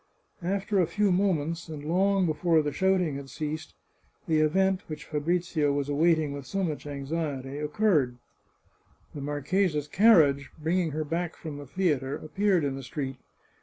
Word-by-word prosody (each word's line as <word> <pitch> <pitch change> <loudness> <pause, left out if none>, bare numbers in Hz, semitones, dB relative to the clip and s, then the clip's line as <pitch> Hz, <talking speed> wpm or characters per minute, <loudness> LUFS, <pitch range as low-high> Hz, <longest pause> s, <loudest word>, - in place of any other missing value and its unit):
After 195 +3 0
a 175 - +3
few 205 -2 +1
moments, 170 -3 0
and 150 -2 -7
long 190 +3 +2
before 160 0 +2
the 145 - -1
shouting 180 -2 +1
had 140 -1 -8
ceased, 155 +1 -5 0.5
the 160 -2 +3
event 190 +5 +2
which 155 -1 -7
Fabrizio 160 -1 0
was 140 0 -1
awaiting 155 0 +2
with 140 -2 -7
so 195 -1 -1
much 155 -4 -3
anxiety 140 -1 -4
occurred 150 - +1 0.5
— - - -36
the 145 - -6
marchesa's 150 +2 0
carriage, 150 -9 +5
bringing 165 +2 0
her 155 +1 -2
back 170 +3 -2
from 155 -3 -7
the 145 - -9
theatre, 145 -5 0
appeared 190 +2 +1
in 140 -1 0
the 135 - -6
street. 135 0 -5
155 Hz, 160 wpm, -28 LUFS, 145-180 Hz, 0.5 s, carriage